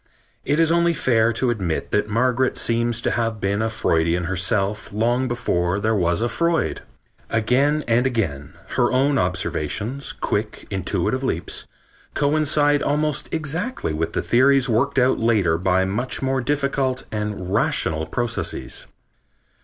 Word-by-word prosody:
It 145 +3 0
is 165 -1 +4
only 170 0 +3
fair 115 -4 +2
to 120 +2 +1
admit 95 -8 -3
that 105 0 +1
Margaret 125 +3 +1
seems 115 0 +1
to - - 0
have 115 -2 -1
been 100 +2 0
a 110 - 0
Freudian 85 -4 +1
herself 95 +4 -1
long 120 +5 +1
before 95 -7 -1
there 110 +2 +1
was 85 0 +1
a - - +2
Freud. 170 +5 0 0.5
Again 135 +7 +2
and 120 +3 +3
again 80 - -2 0.2
her 120 - +1
own 135 +2 +2
observations, 100 - -2
quick, 105 +1 -3
intuitive 100 +6 -1
leaps, 90 -10 -3 0.5
coincide 145 0 +2
almost 150 0 -1
exactly 160 - -3
with 80 +2 -3
theories 130 +2 +3
worked 125 +5 +1
out 130 0 +3
later 100 -8 +2
by 95 0 +2
much 115 +7 -2
more 135 0 0
difficult 140 -1 -1
and 105 -3 -4
rational 80 -6 +1
processes. 120 +7 -3
115 Hz, 140 wpm, -22 LUFS, 100-135 Hz, 0.5 s, is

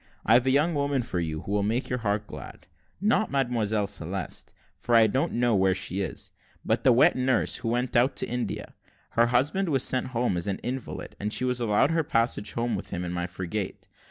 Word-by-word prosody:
I've 120 +3 +5
got - - -2
a - - +4
young 150 +5 +3
woman 140 -3 0
for 95 -6 -3
you, 80 -2 -3
who - - -7
will 105 0 +2
make 115 +6 0
your 125 - -2
heart 105 -1 -1
glad - - -10 0.3
not 215 +2 +2
Mademoiselle 115 -6 0
Celeste, 95 -1 -4 0.2
for 120 - 0
I 115 -1 +7
don't 130 +6 0
know 120 0 +2
where 95 -1 +3
she 95 +1 -1
is 95 - -5 0.3
but - - +1
the 130 - +6
wet 120 - +5
nurse 130 -1 +1
who 125 - -5
went 120 +1 -1
out 120 +3 +3
to - - -2
India. 125 0 -4 0.4
Her 115 +1 +3
husband 145 +10 +1
was 135 -4 +1
sent 130 0 +1
home 120 -7 0
as 85 - -2
an 100 - -1
invalid, 130 0 -5
and 105 +1 -2
she 130 - 0
was 125 -1 0
allowed 115 +6 +3
her 165 0 +2
passage 115 -7 0
home 120 0 -1
with - - -6
him 90 -2 -3
in 90 - -4
my 90 0 -2
frigate. 95 +2 -5
120 Hz, 220 wpm, -27 LUFS, 100-130 Hz, 0.4 s, I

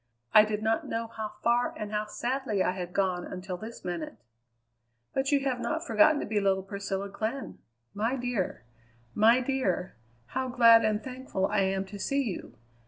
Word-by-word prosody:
"I 215 0 +9
did 215 0 -3
not 225 +1 +1
know 230 0 -2
how 215 -1 -4
far 240 +1 +2
and 210 -1 -5
how 210 0 -1
sadly 240 -2 -1
I - - +1
had 180 -1 -5
gone 185 -2 0
until 185 0 -6
this 220 +3 -9
minute!" 175 -3 -4 1.0
"But 270 +1 0
you 285 -1 +4
have 265 -2 -1
not 320 +6 -2
forgotten 230 +7 +5
to - - -3
be 215 -1 0
little 195 -1 +1
Priscilla 200 0 -4
Glenn. 220 +7 -4 0.3
My 225 +5 0
dear! 245 - -2 0.5
My 230 +4 +5
dear! 245 -9 -1 0.4
how 260 0 -1
glad 230 -2 +7
and 215 0 +1
thankful 255 -7 -3
I 210 +1 +1
am 190 0 +1
to 200 +1 -9
see 275 +6 0
you. 215 -8 -6
215 Hz, 175 wpm, -29 LUFS, 195-245 Hz, 1.0 s, I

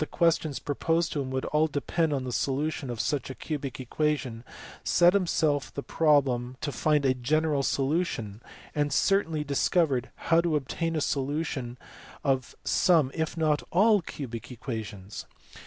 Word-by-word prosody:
questions 160 -4 +1
proposed 165 +4 0
to 145 - -1
him 130 - -4
would 130 0 -2
all 155 +1 +2
depend 155 +2 -1
on 135 -3 -1
the 130 - -4
solution 140 +2 -1
of 120 -2 -4
such 135 0 -1
cubic 145 -4 -4
equations 130 -3 -1 0.4
set 175 +1 +5
himself 160 -7 +1
the 140 - -4
problem 130 -5 +2
to 150 - -3
find 150 0 +1
a 130 - +4
general 145 +3 +1
solution, 135 - -1 0.3
and 145 -1 0
certainly 165 -2 +2
discovered 140 -2 +1
how 165 0 +2
to 170 -2 0
obtain 165 +4 -2
a 155 - 0
solution 140 -3 -2 0.5
of 130 -3 0
some 165 -8 +3
if 160 +1 -2
not 155 -2 +2
all 205 +3 +4
cubic 130 -7 -7
equations. 110 -5 -6
145 Hz, 145 wpm, -28 LUFS, 130-160 Hz, 0.5 s, set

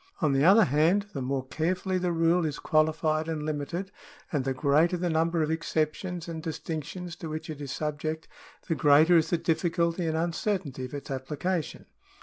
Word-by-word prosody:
On 155 -5 +2
the 135 +1 +3
other 200 +6 +7
hand, 160 +8 +2
the 140 - -3
more 130 0 -2
carefully 180 +4 -1
the 180 -1 0
rule 165 +1 +2
is 150 -3 -2
qualified 155 0 +1
and 155 -2 -3
limited, 155 +6 -3 0.4
and 145 -4 0
the 135 0 -1
greater 155 +6 +3
the 175 0 -1
number 165 +1 +1
of 155 - -1
excep 160 -1 0
tions 180 -3 -6
and 165 -1 -5
distinctions 165 +2 -5
to 165 - -6
which 155 +1 -5
it 150 -1 -8
is 140 -3 -5
subject, 155 +2 -3 0.4
the 170 - +1
greater 155 +3 +5
is 160 -2 +4
the 175 - +2
difficulty 170 +1 0
and 160 0 0
uncertainty 170 -5 -2
of 125 - -8
its 140 -1 -7
application. 150 +6 -3
160 Hz, 185 wpm, -28 LUFS, 150-175 Hz, 0.4 s, other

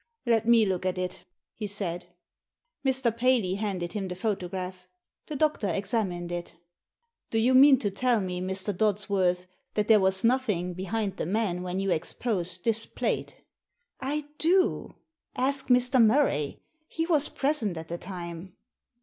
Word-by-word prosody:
" - - -56
Let 230 -2 +2
me 230 -2 +6
look 185 -2 -1
at 185 0 -1
it," 185 0 -4 0.3
he 215 - -5
said. 180 -4 -3 0.8
Mr. 260 -4 +1
Paley 235 -6 +2
handed 190 -4 -3
him 200 -3 -3
the 180 - -5
photograph. 185 -2 -4 0.4
The 305 - -5
doctor 300 -7 +1
examined 190 -2 -2
it 175 -1 -5 0.7
"Do 225 - -1
you 240 +4 +3
mean 270 +1 +8
to 205 -4 -1
tell 240 +3 +2
me, 180 -2 -3
Mr. 190 +2 -2
Dodsworth, 195 -3 +1 0.3
that 210 -1 +1
there 220 -2 +7
was 190 0 +1
nothing 215 -8 +1
behind 195 +2 -3
the - - -3
man 190 -3 0
when 180 +1 -3
you 195 -1 0
ex 165 -1 0
posed 185 -6 -2
this 225 -1 +1
plate?" - - -3 0.3
" 485 0 -39
I 300 -1 -3
do. 365 +3 +2 0.4
Ask 270 +2 0
Mr. 250 0 +4
Murray; 215 - +2 0.2
he 325 0 -2
was 310 -4 +3
present 270 - -1
at 160 0 -7
the 170 +1 -5
time." 175 -1 -7
200 Hz, 160 wpm, -27 LUFS, 180-240 Hz, 0.8 s, mean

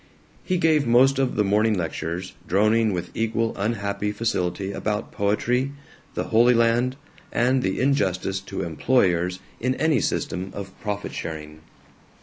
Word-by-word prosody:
He 185 - 0
gave 155 -5 +3
most 130 +3 +5
of 135 -2 +1
the 105 - +3
morning 105 +2 +2
lectures, 85 +1 -3
droning 110 +4 +3
with 90 -2 -4
equal 115 0 -1
unhappy 100 -1 -1
facility 100 -3 -1
about 105 +1 -3
poetry, 125 +7 0 0.4
the - - -1
Holy 120 +2 +6
Land, 115 +2 +2 0.4
and 125 +2 +2
the 95 -3 -1
injustice 95 -8 +1
to 95 0 -5
employers 90 - +1 0.2
in 130 +2 0
any 155 -3 +2
system 95 -1 -2
of 95 -2 -7
profit 105 -1 -4
sharing. 75 -1 -6
105 Hz, 135 wpm, -24 LUFS, 95-125 Hz, 0.4 s, Holy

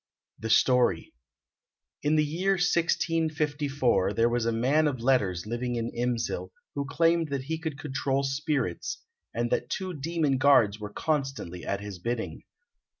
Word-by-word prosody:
] - - -41
The - - -1
Story 120 -6 +3 0.9
In 150 +1 +2
the 155 0 +3
year 180 +6 +1
1654 150 - +1
there 115 +3 +3
was 120 -1 0
a - - +2
man 135 +7 +2
of 135 -4 -2
letters 105 -8 +1
living 120 +2 -2
in 115 0 -2
Imsil 120 -1 -2 0.2
who 140 - -2
claimed 165 +1 +2
that 140 -2 -2
he 160 +3 -3
could 160 -3 -4
control 140 -2 -1
spirits, 135 - -1 0.3
and 120 +1 -2
that 120 - 0
two 185 -1 -3
demon 150 -2 0
guards 115 -7 +5
were 105 0 -5
constantly 135 - -2
at 100 0 -2
his 100 -3 -7
bidding. 115 +4 -3
135 Hz, 150 wpm, -28 LUFS, 115-155 Hz, 0.9 s, guards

